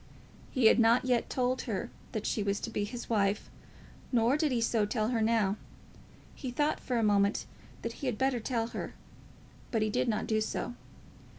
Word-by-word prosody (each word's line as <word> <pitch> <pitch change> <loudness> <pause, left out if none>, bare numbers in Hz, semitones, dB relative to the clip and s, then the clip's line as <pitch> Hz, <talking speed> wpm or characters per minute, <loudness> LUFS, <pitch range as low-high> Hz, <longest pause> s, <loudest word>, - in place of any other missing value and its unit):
He 255 -4 +1
had 220 - +7
not 230 +2 +5
yet 245 -2 +1
told 255 0 0
her 225 +3 -2 0.2
that 215 -3 -3
she 215 - 0
was 200 0 0
to 230 - -4
be 205 -2 -1
his 240 +3 -6
wife, 205 -2 +1 0.6
nor 240 +1 +4
did 300 -1 +1
he 245 - +1
so 230 -1 +2
tell 215 +1 0
her 235 -3 +1
now. 220 -3 +2 0.8
He 260 - -5
thought 295 +5 +1
for 250 - -2
a 230 - +2
moment 200 0 +3 0.4
that 230 - -3
he 275 - -2
had 245 -4 -1
better 265 -1 +1
tell 230 0 -1
her, - - -5 0.7
but 225 -2 +1
he 215 - 0
did - - +1
not 215 -2 0
do 215 -1 +1
so. 230 +2 -2
230 Hz, 195 wpm, -31 LUFS, 215-245 Hz, 0.8 s, had